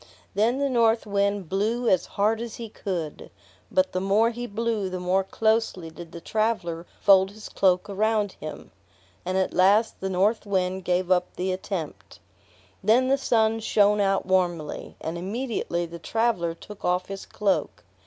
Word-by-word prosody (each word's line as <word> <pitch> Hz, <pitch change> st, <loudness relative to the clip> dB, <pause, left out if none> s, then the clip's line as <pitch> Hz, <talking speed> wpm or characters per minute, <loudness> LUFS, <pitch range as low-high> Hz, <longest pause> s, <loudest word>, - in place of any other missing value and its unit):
Then 230 Hz, +5 st, +2 dB
the 280 Hz, 0 st, +1 dB
North 230 Hz, -3 st, +2 dB
Wind 200 Hz, -2 st, 0 dB
blew 220 Hz, +7 st, 0 dB
as 185 Hz, -4 st, +3 dB
hard 215 Hz, +3 st, +2 dB
as 235 Hz, -2 st, -6 dB
he 230 Hz, -2 st, -7 dB
could, 175 Hz, -8 st, -5 dB, 0.4 s
but 185 Hz, 0 st, +2 dB
the 185 Hz, -, -2 dB
more 210 Hz, +4 st, +3 dB
he 240 Hz, +1 st, -5 dB
blew 220 Hz, -2 st, -1 dB
the 185 Hz, 0 st, -4 dB
more 185 Hz, +2 st, +1 dB
closely 220 Hz, -5 st, 0 dB
did 165 Hz, 0 st, -10 dB
the 170 Hz, -, -8 dB
traveler 180 Hz, -5 st, -1 dB
fold 195 Hz, -1 st, +5 dB
his 210 Hz, +1 st, -10 dB
cloak 185 Hz, -1 st, +2 dB
around 210 Hz, 0 st, +1 dB
him; 155 Hz, -3 st, -9 dB, 0.6 s
and 185 Hz, +1 st, 0 dB
at 190 Hz, -, 0 dB
last 200 Hz, +5 st, +3 dB
the 190 Hz, -, -3 dB
North 195 Hz, +5 st, +1 dB
Wind 190 Hz, -2 st, -1 dB
gave 180 Hz, 0 st, 0 dB
up 180 Hz, -1 st, +3 dB
the 185 Hz, +1 st, -1 dB
attempt. 185 Hz, -3 st, -5 dB, 0.6 s
Then 240 Hz, +6 st, +4 dB
the 270 Hz, -, +5 dB
Sun 225 Hz, -3 st, +2 dB
shined 210 Hz, -1 st, +3 dB
out 195 Hz, -1 st, +1 dB
warmly, 175 Hz, -5 st, -1 dB
and 165 Hz, +2 st, -4 dB
immediately 200 Hz, -3 st, -2 dB
the 170 Hz, 0 st, -9 dB
traveler 215 Hz, -8 st, 0 dB
took 205 Hz, +4 st, -12 dB
off 180 Hz, +1 st, +1 dB
his 195 Hz, 0 st, -8 dB
cloak. 200 Hz, -2 st, -1 dB
195 Hz, 165 wpm, -25 LUFS, 180-220 Hz, 0.6 s, fold